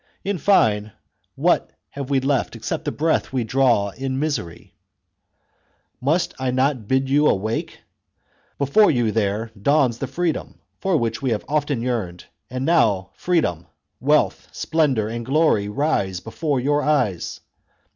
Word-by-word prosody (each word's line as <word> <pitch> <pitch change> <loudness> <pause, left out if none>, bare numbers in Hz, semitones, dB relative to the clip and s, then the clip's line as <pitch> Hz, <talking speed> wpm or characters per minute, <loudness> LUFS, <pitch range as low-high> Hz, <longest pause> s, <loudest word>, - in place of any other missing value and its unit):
In 200 -2 -2
fine, 105 - +3 0.4
what - - +2 0.2
have 140 -1 -6
we 140 -1 +3
left 135 -1 0
except - - -4
the - - -1
breath 160 +1 0
we 130 -2 0
draw 120 -4 +2
in 130 +3 -3
misery? 145 - -4 0.7
" - - -45
Must 170 +1 +1
I 130 -1 -1
not 130 +3 +2
then 110 - -14
bid 130 +2 +1
you 145 +2 +4
awake? 110 +4 -1 0.8
Before 145 +10 +4
you 120 -5 +1
there 110 +1 -1
dawns 135 -3 +2
the 135 - -3
freedom 170 0 -2 0.2
for 190 -4 +1
which 115 -3 -2
you 135 - -2
have 105 - -4
often 145 -5 0
yearned, 105 -9 -3 0.2
and 130 +1 -3
now 105 - +2
freedom, 90 - 0 0.3
wealth, 150 +4 +1
splendour, 140 -10 0
and 115 +1 -4
glory 135 -6 +2
rise 105 - 0
before 140 - -2
your 145 +3 +1
eyes. 135 - 0
130 Hz, 145 wpm, -22 LUFS, 110-150 Hz, 0.8 s, you